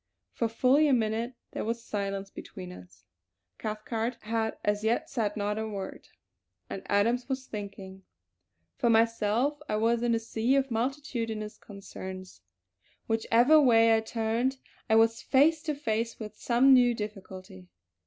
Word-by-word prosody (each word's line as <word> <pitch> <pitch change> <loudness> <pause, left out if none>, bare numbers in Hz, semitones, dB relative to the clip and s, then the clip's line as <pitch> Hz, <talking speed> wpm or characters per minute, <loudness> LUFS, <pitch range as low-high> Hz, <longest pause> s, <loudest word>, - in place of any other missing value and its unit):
For 230 - 0
fully 260 +6 +3
a 280 - +3
minute 230 +1 0 0.2
there - - -4
was 230 +1 -3
silence 195 -1 -3
between 90 -1 -9
us. 90 -1 -14 0.5
Cathcart 220 +2 -3
had 220 0 -2
as 205 0 0
yet 225 +2 0
said 215 -4 -1
not 210 +1 -1
a 220 - -3
word, 200 -3 -7 0.6
and 195 - -4
Adams 235 +6 +1
was 265 0 -3
thinking. 195 -3 -8 0.8
For 235 - +1
myself 230 +5 +2
I - - 0
was 230 +2 +2
in 240 -1 +2
a - - 0
sea 230 +3 0
of 270 -1 +1
multitudinous 230 -3 -3
concerns; 190 - -9 0.6
whichever 235 +6 +4
way 230 -4 +5
I - - +3
turned 225 +4 -1 0.3
I 220 - +4
was 225 0 +4
face 300 +4 +3
to 305 -2 -2
face 230 -4 -2
with 215 -2 -7
some 255 +3 +4
new 245 -2 +5
difficulty. 190 - -8
225 Hz, 145 wpm, -29 LUFS, 210-240 Hz, 0.8 s, way